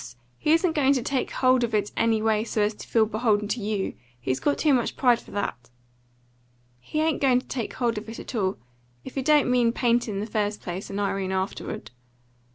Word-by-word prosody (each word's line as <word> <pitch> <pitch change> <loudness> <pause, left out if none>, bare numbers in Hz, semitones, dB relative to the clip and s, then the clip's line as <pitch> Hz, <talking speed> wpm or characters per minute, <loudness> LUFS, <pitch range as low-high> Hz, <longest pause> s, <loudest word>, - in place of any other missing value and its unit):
He 300 - +1
isn't 330 0 +3
going 280 -3 +3
to 255 -4 -1
take 265 0 -1
hold 255 -1 +3
of 230 -2 0
it 205 -1 0
any 225 -1 +2
way 220 -1 +2
so 220 -2 0
as 210 +1 +1
to - - -11
feel 225 -2 +3
beholden 215 -1 +1
to 225 +3 -1
you. 205 -1 -2 0.3
He's 130 +1 -1
got 290 - +1
too 300 -3 +3
much 245 -3 0
pride 245 -3 +4
for - - -16
that." 125 -12 -4 1.1
"He 305 - -4
ain't 315 -1 +1
going 260 -3 +4
to - - -14
take 240 -4 -4
hold 235 -3 0
of 215 - -11
it 225 - -7
at - - -8
all, 195 -4 0 0.5
if - - -8
he 270 - -1
don't 295 -2 +4
mean 240 -2 +3
paint 240 0 +1
in 200 -2 -3
the 205 - -2
first 210 -1 -1
place 180 +2 -6
and 200 - -4
Irene 195 -1 -1
afterward. 190 -7 -4
225 Hz, 220 wpm, -25 LUFS, 205-255 Hz, 1.1 s, pride